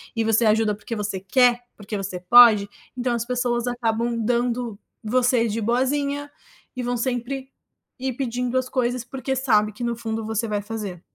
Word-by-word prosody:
e 225 - +1
você 225 +1 +3
ajuda 215 0 +3
porque 220 +3 -6
você 210 -2 -3
quer, 245 +5 +3
porque 205 0 -5
você 190 -2 -4
pode. 215 0 +7 0.3
Então 245 0 0
as 235 -1 -2
pessoas 245 -1 -1
acabam 235 -1 -1
dando 235 -1 -1 0.2
você 245 +1 +2
de 220 +1 -2
boazinha 280 +5 0 0.4
e 250 - -3
vão 245 0 -1
sempre 260 +2 -3 0.5
ir 260 +1 -2
pedindo 250 -1 -1
as 255 0 0
coisas, 245 -1 -1
porque 265 +1 -3
sabe 215 -5 +2
que 225 - -12
no 235 0 -1
fundo 225 -1 -4
você 220 +1 -1
vai 205 -1 -1
fazer. 205 -4 -6
235 Hz, 170 wpm, -23 LUFS, 220-250 Hz, 0.5 s, pode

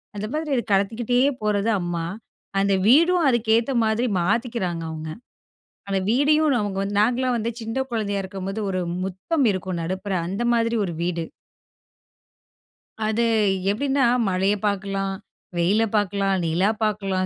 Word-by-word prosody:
அந்த 205 +1 -3
மாதிரி 305 -3 -1
இது 235 - 0
கடத்திக்கிட்டே 225 +5 +1 0.2
போறது 210 +1 +1
அம்மா. 170 -1 -2 0.5
அந்த 200 0 +2
வீடும் 335 +6 +5
அதுக்கு 235 -2 0
ஏத்த 235 +4 -1
மாதிரி 225 +3 +1
மாத்திக்கிறாங்க 195 -4 -1
அவங்க. 160 0 -6 0.8
அந்த 195 -1 +1
வீடையும் 295 +4 +3
அவங்க 200 -2 -3
வந்து 200 +1 -2
நாங்களாம் 250 +2 +1
வந்து 230 +1 -2
சின்ன 225 +3 -4
குழந்தையா 205 -3 -1
இருக்கும்போது 195 +2 -5
ஒரு 185 -1 -1 0.2
முற்றம் 215 - -1
இருக்கும், 185 -2 -4
நடுப்புற 190 +3 -3
அந்த 200 +6 -2
மாதிரி 230 0 +1
ஒரு 170 - -4
வீடு. 170 -2 -2 1.8
அது 225 +2 +1 0.5
எப்டின்னா 270 +3 +1 0.2
மழைய 190 +3 +1
பாக்கலாம், 195 -1 -1 0.4
வெயில 200 +6 +3
பாக்கலாம், 200 -1 +1
நிலா 175 +6 +2
பாக்கலாம், 195 -3 0
205 Hz, 130 wpm, -23 LUFS, 190-235 Hz, 1.8 s, வீடும்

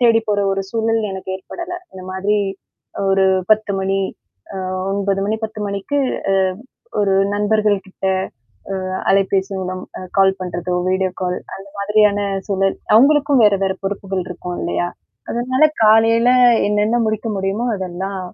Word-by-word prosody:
தேடிப் 225 -2 +4
போற 205 - +1
ஒரு 195 0 -1
சூழல் 225 0 0
எனக்கு 190 0 -5
ஏற்படல. 345 - -7 0.2
இந்த 185 -1 -10
மாதிரி 200 +3 +1 0.7
ஒரு 195 0 +4 0.3
10:00 215 -1 +1
மணி 195 0 0 0.6
அ - - -3 0.3
9:00 200 -1 0
மணி, 215 +2 0
10:00 220 0 -12
மணிக்கு 200 +9 -2 0.3
அ - - +3 0.7
ஒரு 200 -1 +2 0.2
நண்பர்கள் 210 0 +2
கிட்ட, 190 0 -6 0.7
அ, - - -1 0.4
அலைபேசி 195 0 +2
மூலம் 185 0 -4 0.3
கால் 190 0 +5
பண்றதோ, 180 0 -3 0.2
வீடியோ 185 0 +1
கால் 180 -1 -1 0.2
அந்த 195 +1 -11
மாதிரியான 210 0 +3 0.3
சூழல். 195 -1 0 0.2
அவங்களுக்கும் 280 +2 +5
வேற 205 -1 +5
வேற 190 0 0
பொறுப்புகள் 195 -1 -2
இருக்கும் 180 0 -6
இல்லையா? 175 0 -1 0.4
அதனால 255 +4 +1 0.2
காலையில 225 +2 +5 0.4
என்னென்ன 210 +3 +2
முடிக்க 215 +1 -2
முடியுமோ, 195 +5 -1
அதெல்லாம் 190 +1 -4
200 Hz, 135 wpm, -19 LUFS, 190-220 Hz, 0.7 s, கால்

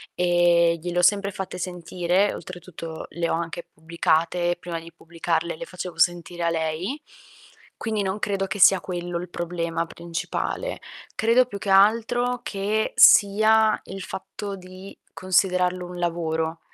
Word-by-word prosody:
ehm, 175 -1 +3
gliel'ho 175 +2 -1
sempre 200 +2 +3
fatte 190 -1 -6
sentire, 180 +2 -1
oltretutto 170 -2 -8
le 170 0 -2
ho - - 0
anche 170 +1 -4
pubblicate, 170 +2 0
prima 175 -1 -5
di 165 +1 -12
pubblicarle 165 0 -3
le - - -6
facevo 180 -1 -7
sentire 175 0 +1
a - - +3
lei, 165 - -2 0.8
quindi 215 -2 -2
non 190 +2 -2
credo 195 -2 -1
che 190 +2 -5
sia 190 0 +7
quello 175 -1 -4
il 180 - -7
problema 170 -1 -3
principale. 170 - -4 0.3
Credo 230 +3 +3
più 235 -5 -7
che 200 0 -5
altro 230 +5 +3
che 210 +1 -2
sia 215 +2 +6
il 195 +1 -8
fatto 200 +2 -6
di 185 +1 -12
considerarlo 185 -1 +1
un 180 0 -8
lavoro. 165 -1 -2
180 Hz, 140 wpm, -24 LUFS, 170-195 Hz, 0.8 s, sia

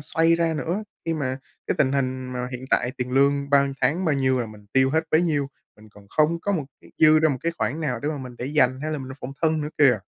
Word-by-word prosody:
xoay 165 +3 +2
ra 165 -1 +1
nữa, 170 +7 -2 0.2
khi 165 -1 -1
mà 130 -3 -2 0.3
cái - - 0
tình 135 0 +3
hình 130 -2 -1
mà 125 0 -3
hiện 125 +1 -6
tại 125 - +2
tiền 125 0 -3
lương 140 +1 +2
bao 140 -1 +6
nhiêu 140 - -2
tháng 155 +9 +1
bao 155 -3 +2
nhiêu 130 -2 +1
là 120 - -2
mình 105 -1 -13
tiêu 130 0 +4
hết 160 +2 +1
bấy 160 +2 +4
nhiêu, 145 -5 0 0.3
mình 110 0 -17
còn 100 -1 -17
không 155 +7 +2
có 200 - -1
một 165 -7 -1 0.2
cái - - -18
dư 155 0 +7
ra 155 0 +4
một 135 - -1
cái 170 - -1
khoản 155 - -1
nào 130 -7 -2
để 145 - -2
mà 150 -1 -3
mình 125 -2 -8
để 125 - -4
dành 130 -3 +2
hay 155 - -2
là 150 - -2
mình 130 - -7
làm 135 - -8
phòng 130 - -6
thân 160 -1 +2
nữa 150 - -3
kìa. 130 -7 +5
140 Hz, 290 wpm, -24 LUFS, 130-155 Hz, 0.3 s, dư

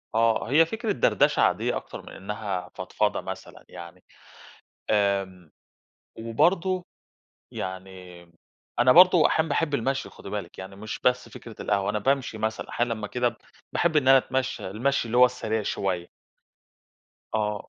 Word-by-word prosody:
آه، 115 0 +2
هي 155 +5 +5
فكرة 220 +5 -3
دردشة 120 - +2
عادية - - +1
أكتر - - -8
من - - -13
إنها 100 -2 -5
فضفضة - - -1
مثلًا - - -9
يعني، 85 +2 -11 0.9
آمم، 95 -5 0 0.7
وبرضه 175 +11 +1 0.7
يعني 95 -1 -7 0.6
أنا 125 +1 +6
برضه 180 0 +7
أحيانًا 160 0 +1
باحب 145 0 0
المشي 135 +1 -1
خدي 100 - -11
بالِك، 105 -1 -6
يعني 95 +1 -8
مش 110 +1 -6
بس 125 -1 +2
فكرة 115 0 -10
القهوة، 100 -1 0
أنا 105 - -1
بامشي 130 0 0
مثلًا، 110 0 -3
أحيانًا 120 -1 -1
لمّا 110 -2 -5
كده، 120 +1 -1 0.4
باحب 170 -2 +1
إن 140 -3 +3
أنا 135 0 +8
أتمشي، 130 0 -2
المشي 120 +5 0
اللي 115 +1 -2
هو 125 - +9
السريع 110 -3 -1
شوية. 90 -3 -2 1.2
آه، 105 -1 -2
110 Hz, 145 wpm, -26 LUFS, 100-135 Hz, 1.2 s, هو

